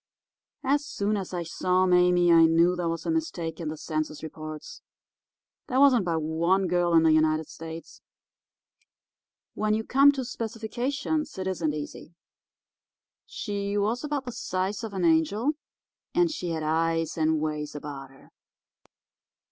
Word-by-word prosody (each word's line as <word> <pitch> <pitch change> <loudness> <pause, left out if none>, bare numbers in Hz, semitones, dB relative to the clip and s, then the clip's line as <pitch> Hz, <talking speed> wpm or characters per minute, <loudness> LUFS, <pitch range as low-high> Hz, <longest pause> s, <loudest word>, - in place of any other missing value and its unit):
"As 285 +2 +2
soon 210 -7 -1
as 195 -3 -4
I 175 -2 -3
saw 185 +2 +1
Mame 180 -1 +4
I 165 -1 +7
knew 170 +2 +4
there 175 -2 -1
was 165 0 -4
a - - 0
mistake 245 - -3
in 165 - -4
the 155 +1 -4
census 155 -1 -4
reports. 155 -1 -8 0.9
There 260 -1 +1
wasn't 260 -7 +5
but 165 -2 0
one 170 +5 +1
girl 175 -1 +2
in 165 - +6
the 160 - +5
United 155 0 +2
States. 165 0 -9 1.5
When 215 0 0
you 220 - -2
come 275 +5 +5
to 265 -2 -3
specifications 250 +6 -3
it 190 - -3
isn't 170 -5 -1
easy. 150 +3 -8 1.1
She 200 -1 -3
was 220 +6 0
about 290 -2 -2
the 245 - -4
size 195 0 -3
of 215 -3 -6
an 185 -2 0
angel, 170 - +2 0.6
and 350 -1 +3
she 185 - -4
had 160 -1 -2
eyes, 165 +1 0
and 160 -1 +1
ways 150 -1 -3
about 140 -2 -7
her. 135 0 -20
180 Hz, 150 wpm, -27 LUFS, 160-220 Hz, 1.5 s, I